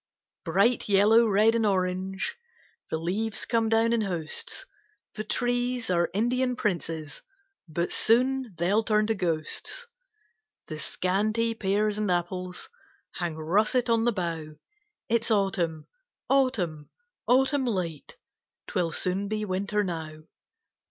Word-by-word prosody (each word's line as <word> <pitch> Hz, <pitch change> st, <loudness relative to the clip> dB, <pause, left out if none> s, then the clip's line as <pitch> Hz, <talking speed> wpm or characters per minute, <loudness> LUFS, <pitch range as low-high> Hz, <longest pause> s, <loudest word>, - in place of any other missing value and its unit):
Bright 235 Hz, -2 st, +2 dB
yellow, 215 Hz, +4 st, +5 dB
red, 215 Hz, +2 st, +4 dB
and 230 Hz, -1 st, +1 dB
orange, 190 Hz, -1 st, -1 dB, 0.5 s
The -, -, -1 dB
leaves 200 Hz, +7 st, -1 dB
come 225 Hz, -2 st, +1 dB
down 225 Hz, +1 st, +3 dB
in 230 Hz, -, +2 dB
hosts; 175 Hz, -6 st, -3 dB, 0.5 s
The 215 Hz, -, -4 dB
trees 245 Hz, 0 st, -1 dB
are 170 Hz, -1 st, +2 dB
Indian 250 Hz, +4 st, +1 dB
Princes, 165 Hz, -, -3 dB, 0.5 s
But 170 Hz, +2 st, -2 dB
soon 250 Hz, -1 st, +2 dB
they'll 190 Hz, +6 st, +2 dB
turn 215 Hz, -1 st, +2 dB
to 225 Hz, -, +1 dB
Ghosts; 175 Hz, -, -2 dB, 0.8 s
The 155 Hz, -1 st, -6 dB
scanty 215 Hz, +8 st, 0 dB
pears 210 Hz, 0 st, 0 dB
and 210 Hz, -2 st, 0 dB
apples 180 Hz, +1 st, -2 dB, 0.4 s
Hang 170 Hz, -3 st, -3 dB
russet 215 Hz, +10 st, +1 dB
on 230 Hz, 0 st, +3 dB
the 240 Hz, -, +4 dB
bough, 165 Hz, -6 st, -4 dB, 0.5 s
It's 230 Hz, +1 st, +1 dB
Autumn, 185 Hz, -7 st, 0 dB, 0.5 s
Autumn, 195 Hz, -, +1 dB, 0.4 s
Autumn 265 Hz, +2 st, +3 dB
late, 175 Hz, -9 st, -3 dB, 0.5 s
'Twill 175 Hz, -3 st, -1 dB
soon 185 Hz, +4 st, -1 dB
be 215 Hz, 0 st, -2 dB
Winter 200 Hz, +2 st, 0 dB
now. 160 Hz, -4 st, -5 dB
200 Hz, 120 wpm, -27 LUFS, 175-230 Hz, 0.8 s, yellow